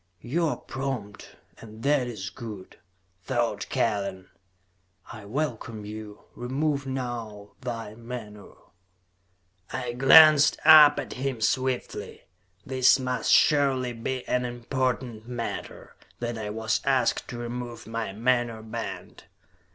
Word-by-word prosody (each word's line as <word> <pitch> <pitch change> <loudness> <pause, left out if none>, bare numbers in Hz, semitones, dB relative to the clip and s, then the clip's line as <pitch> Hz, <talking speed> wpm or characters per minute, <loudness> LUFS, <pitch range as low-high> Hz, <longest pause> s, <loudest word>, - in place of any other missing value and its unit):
"You 165 +7 0
are - - -2
prompt, 130 -7 -6 0.2
and 110 0 -12
that 140 -3 +2
is 105 -4 -6
good," 105 -6 -9 0.4
thought 120 +5 -2
Kellen. 100 -4 -1 0.8
"I 110 -3 -10
welcome 115 -3 -4
you. 105 0 -9
Remove 140 +3 -2
now 120 -6 -5
thy 115 -4 -5
menore." 115 -3 -10 1.0
I 125 -2 -3
glanced 150 +3 +7
up 155 -2 +9
at - - -5
him 130 -2 -3
swiftly. 130 +2 -2 0.4
This 130 -1 +4
must 125 -1 -1
surely 135 -4 +3
be 125 +2 -4
an 125 0 +1
important 120 -2 -3
matter, 120 -2 -6 0.2
that 120 0 -3
I 110 -2 -5
was 110 +1 -1
asked 135 -2 +1
to 120 - -7
remove 120 0 -6
my 115 -2 -4
menore 120 +1 0
band. 110 - -7
120 Hz, 115 wpm, -26 LUFS, 110-130 Hz, 1.0 s, up